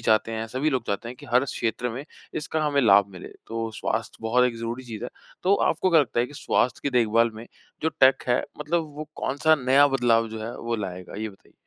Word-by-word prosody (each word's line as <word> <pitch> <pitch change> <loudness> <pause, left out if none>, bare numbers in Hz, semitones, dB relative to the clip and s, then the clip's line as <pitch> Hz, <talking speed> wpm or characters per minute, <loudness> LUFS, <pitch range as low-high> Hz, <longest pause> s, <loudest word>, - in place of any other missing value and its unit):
चाहते 110 0 +2
हैं 110 0 -3
सभी 130 +7 -1
लोग 130 -4 -1
चाहते 100 +3 -3
हैं 125 - -8
कि - - -13
हर 125 +2 +5
क्षेत्र 125 -2 -2
में 130 +5 -6 0.3
इसका 155 +1 -2
हमें 145 -1 +2
लाभ 100 -4 +6
मिले। 90 - -9 0.2
तो 115 0 -3
स्वास्थ्य 110 +1 -3
बहुत 125 +3 +3
एक 120 -2 -3
ज़रूरी 115 +3 -4
चीज़ 115 -3 -7
है। - - -5 0.3
तो 190 +2 +4
आपको 185 - +1
क्या 165 -2 +6
लगता 120 -4 0
है 120 - +1
कि 145 - -14
स्वास्थ्य 125 -3 0
की 140 - -1
देखभाल 115 0 +3
में 110 +2 -9 0.4
जो 160 - +2
टेक 130 0 +6
है 120 +1 +3 0.2
मतलब 160 +3 0
वो 155 0 -6
कौन-सा 150 +4 +2
नया 135 +3 +6
बदलाव 120 -4 +2
जो 110 0 -7
है 115 +2 -5
वो 115 0 -3
लाएगा? 90 -3 -6
ये 110 +2 -3
बताइए। 95 -2 -18
120 Hz, 230 wpm, -25 LUFS, 110-140 Hz, 0.4 s, लाभ